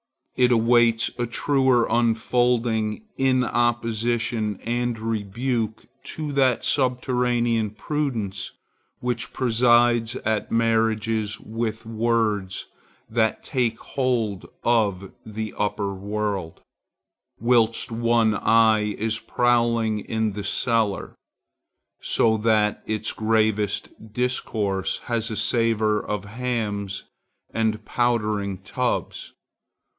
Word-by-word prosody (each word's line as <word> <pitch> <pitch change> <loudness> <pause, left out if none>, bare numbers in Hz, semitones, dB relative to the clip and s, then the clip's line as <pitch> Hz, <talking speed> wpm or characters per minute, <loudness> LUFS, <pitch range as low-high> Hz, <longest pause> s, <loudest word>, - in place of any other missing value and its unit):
It 125 -1 +3
awaits 115 0 +3
a 120 - 0
truer 130 -1 +2
unfolding 115 - +1
in 130 -1 +3
opposition 115 -2 0
and 120 0 -1
rebuke 110 +1 -2 0.2
to 155 -2 -4
that 130 -3 +2
subterranean 125 -4 +1
prudence 110 -5 -3 0.5
which 125 0 -2
presides 120 -1 +3
at 110 -1 -1
marriages 115 -1 +1
with 115 0 -4
words 110 -4 0 0.4
that 110 -1 0
take 120 -5 0
hold 120 -7 -2 0.2
of 100 -5 +1
the 110 0 -5
upper 100 -1 -1
world, 100 -3 -3 0.8
whilst 115 -1 +2
one 115 -1 +2
eye 110 -1 +3
is 110 +1 -1
prowling 115 -2 +1
in 110 +1 -1
the 100 +1 -5
cellar; 115 -5 0 0.9
so 110 -1 +2
that 105 -1 +2
its 110 0 -1
gravest 110 -2 +1 0.2
discourse 105 -5 -1
has 115 -1 -1
a 110 - -3
savor 110 -1 +1
of 105 -2 -3
hams 105 -3 -3 0.5
and 110 -1 -1
powdering 105 -5 0
tubs. 120 +7 -3
115 Hz, 95 wpm, -24 LUFS, 105-120 Hz, 0.9 s, It